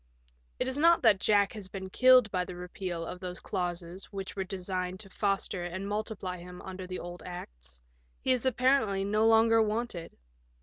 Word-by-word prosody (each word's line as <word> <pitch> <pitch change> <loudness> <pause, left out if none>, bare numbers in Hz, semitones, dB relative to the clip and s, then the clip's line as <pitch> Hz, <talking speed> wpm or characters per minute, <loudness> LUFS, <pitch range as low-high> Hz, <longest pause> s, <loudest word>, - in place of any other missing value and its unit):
It - - 0
is 260 +2 -2
not 335 +2 +5
that 215 -5 +6
Jack 205 0 +3
has 210 -4 -7
been 190 0 -7
killed 255 -3 +6
by 180 -2 0
the 180 0 -8
repeal 180 -1 -5
of 180 - -6
those 180 -1 -5
clauses 175 0 -4
which 195 -2 -7
were 195 - -1
designed 185 -1 -4
to 195 -3 -10
foster 195 -3 -1
and 185 +3 -4
multiply 205 -3 -3
him 180 +1 -10
under 185 -1 -7
the 185 0 -4
old 175 -1 -7
Acts; 65 - -9 0.4
he 260 - +2
is 250 -2 +2
apparently 255 -6 +2
no 215 +2 +3
longer 225 0 +5
wanted. 215 -5 -2
195 Hz, 180 wpm, -30 LUFS, 180-220 Hz, 0.4 s, that